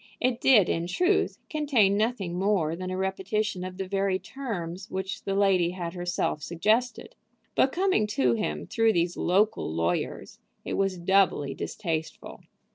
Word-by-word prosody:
It 250 Hz, -1 st, 0 dB
did, 215 Hz, -9 st, +6 dB
in 165 Hz, +1 st, -1 dB
truth, 360 Hz, -, +1 dB
contain 280 Hz, -, +2 dB
nothing 210 Hz, -4 st, -1 dB
more 180 Hz, -4 st, +1 dB
than 185 Hz, +1 st, -5 dB
a 185 Hz, -, -3 dB
repetition 190 Hz, +1 st, -2 dB
of 185 Hz, 0 st, -7 dB
the 190 Hz, -1 st, -4 dB
very 195 Hz, 0 st, 0 dB
terms 195 Hz, -5 st, -6 dB
which 190 Hz, +1 st, -4 dB
the 195 Hz, -, -1 dB
lady 195 Hz, -4 st, +3 dB
had 170 Hz, -2 st, -5 dB
herself 175 Hz, -4 st, -2 dB
suggested; 220 Hz, +9 st, 0 dB, 0.4 s
but 265 Hz, -, +3 dB
coming 370 Hz, -, +1 dB
to 125 Hz, -3 st, +3 dB
him 75 Hz, -9 st, -2 dB
through 225 Hz, -1 st, +2 dB
these 170 Hz, 0 st, 0 dB
local 200 Hz, -, +1 dB
lawyers 85 Hz, +2 st, -2 dB, 0.3 s
it -, -, -3 dB
was 195 Hz, -1 st, 0 dB
doubly 175 Hz, -6 st, +2 dB
distasteful. 165 Hz, -6 st, -5 dB
190 Hz, 150 wpm, -27 LUFS, 175-215 Hz, 0.4 s, did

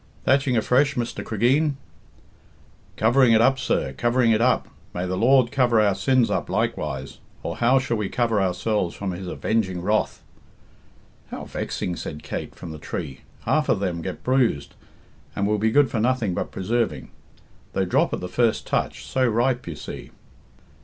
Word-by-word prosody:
"Thatching 135 Hz, -2 st, +3 dB
afresh, 135 Hz, +5 st, +2 dB
Mr. 120 Hz, -2 st, -3 dB
Cregeen?" 135 Hz, +7 st, +1 dB, 1.2 s
"Covering 120 Hz, +2 st, +4 dB
it 110 Hz, -, +5 dB
up, 130 Hz, +3 st, +4 dB
sir; 65 Hz, -, -1 dB
covering 120 Hz, -, +2 dB
it 110 Hz, 0 st, +3 dB
up. 125 Hz, +1 st, +2 dB, 0.3 s
May 90 Hz, +1 st, -2 dB
the 95 Hz, 0 st, -2 dB
Lord 125 Hz, +3 st, +4 dB
cover 125 Hz, -5 st, +3 dB
our 105 Hz, -2 st, +4 dB
sins 120 Hz, +5 st, +2 dB
up -, -, -1 dB
likewise, 70 Hz, -3 st, -2 dB, 0.2 s
or -, -, -4 dB
how 120 Hz, +3 st, +4 dB
shall 130 Hz, -3 st, 0 dB
we 105 Hz, -2 st, -2 dB
cover 115 Hz, -4 st, +1 dB
ourselves 95 Hz, 0 st, 0 dB
from 100 Hz, -2 st, -3 dB
His 90 Hz, +1 st, -6 dB
avenging 95 Hz, -2 st, -1 dB
wrath?" 105 Hz, +5 st, -1 dB, 1.1 s
"How -, -, -6 dB
vexing!" 90 Hz, -, -3 dB
said 75 Hz, 0 st, -7 dB
Kate, 70 Hz, -, -5 dB
from 85 Hz, -, -8 dB
the 80 Hz, -, -8 dB
tree. 70 Hz, -1 st, -6 dB, 0.2 s
"Half 155 Hz, -1 st, +1 dB
of -, -, +3 dB
them 90 Hz, -4 st, -2 dB
get -, -, -6 dB
bruised, 125 Hz, -, +1 dB, 0.6 s
and 100 Hz, -, 0 dB
will 105 Hz, +1 st, +1 dB
be 110 Hz, +2 st, +2 dB
good 145 Hz, +4 st, +3 dB
for 115 Hz, -, -1 dB
nothing 120 Hz, -4 st, +1 dB
but -, -, -3 dB
preserving. 115 Hz, +4 st, -2 dB, 0.6 s
They -, -, +1 dB
drop -, -, +2 dB
at -, -, -3 dB
the 90 Hz, -, -4 dB
first 115 Hz, +4 st, +1 dB
touch -, -, -2 dB
so 130 Hz, -1 st, +1 dB
ripe, 120 Hz, +1 st, +1 dB
you 85 Hz, -, -5 dB
see." 70 Hz, -, -8 dB
115 Hz, 170 wpm, -24 LUFS, 95-125 Hz, 1.2 s, it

